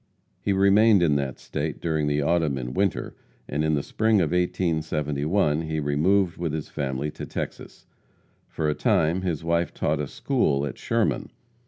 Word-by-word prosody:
He 100 - 0
remained 100 +1 +5
in 80 -3 +3
that 70 -2 -3
state 75 +1 -4
during 80 -3 0
the 75 0 +1
autumn 80 -3 +1
and 65 0 -5
winter, 100 -1 -1 0.3
and 75 +2 -1
in 80 0 +2
the 70 - -1
spring 110 -1 +2
of 85 -4 +1
1871 80 -2 0
he 80 -1 -3
removed 85 +6 +2
with 85 -3 -2
his 80 -1 -4
family 70 +1 -3
to - - -7
Texas. - - -6 0.6
For 80 - -2
a 75 - +2
time, 80 +4 +1
his 85 -4 -2
wife 85 +1 0
taught 75 0 0
a 75 - -2
school 70 +1 0
at 70 - -6
Sherman. - - 0
80 Hz, 170 wpm, -25 LUFS, 75-90 Hz, 0.6 s, remained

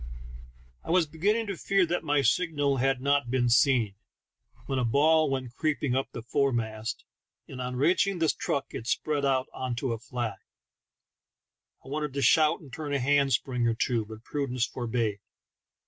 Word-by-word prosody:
I - - -11
was 175 0 +4
beginning 200 +9 0
to 200 -2 -4
fear 195 +2 +2
that 175 +1 -2
my 145 -2 +2
signal 145 0 +1
had 135 0 +1
not 140 -2 +1
been 125 -1 +1
seen, 120 -3 +3 0.7
when 135 -1 -1
a - - 0
ball 155 +6 +3
went 130 -3 -3
creeping 145 -5 0
up 135 - -1
the 115 - -7
fore 140 +4 +1
mast, 110 -2 -3 0.4
and 130 -1 -7
on 125 0 -4
reaching 180 +8 +2
the 165 -1 +1
truck 140 - -2
it 115 - -6
spread 145 +2 0
out 130 -1 +2
into 125 -1 -2
a 115 - -5
flag. 120 -2 -4 1.5
I - - -10
wanted 150 -1 -3
to 140 - 0
shout 155 +6 +4
and 140 -6 -14
turn 145 0 -4
a 140 - +1
hand 140 +1 +2
spring 125 0 0
or 115 - +1
two, 115 -1 0
but 110 +1 -11
prudence 130 -4 -1
forbade. 115 -4 -2
135 Hz, 175 wpm, -28 LUFS, 120-150 Hz, 1.5 s, was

